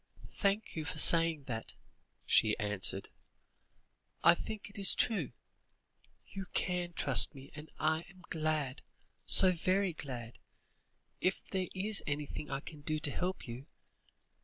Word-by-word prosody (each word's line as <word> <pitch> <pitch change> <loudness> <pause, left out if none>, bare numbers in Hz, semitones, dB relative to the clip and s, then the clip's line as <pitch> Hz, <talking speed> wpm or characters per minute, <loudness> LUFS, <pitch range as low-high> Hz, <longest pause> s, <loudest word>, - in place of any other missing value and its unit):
"Thank 200 +2 -1
you 160 - -3
for 180 +5 -3
saying 165 -3 +4
that," 115 -4 -6 0.5
she 110 -1 +3
answered. 105 -2 -1 1.1
"I 170 - +8
think 215 +4 -7
it 200 +1 -10
is 195 - +4
true. 195 - 0 0.9
You 195 -1 -8
can 180 -1 -2
trust 160 - +6
me, 135 0 -12
and 155 +1 -10
I 160 +1 +1
am 185 -1 -18
glad, 155 -4 -2 0.5
so 185 - +8
very 185 +2 0
glad, 125 -6 -8 0.8
if 185 - -1
there 185 -2 -1
is 205 +2 +1
anything 145 0 -4
I 135 0 -3
can 150 0 -11
do 155 +1 -2
to 145 -1 +1
help 180 0 -3
you. 125 +5 -8
160 Hz, 135 wpm, -33 LUFS, 140-185 Hz, 1.1 s, I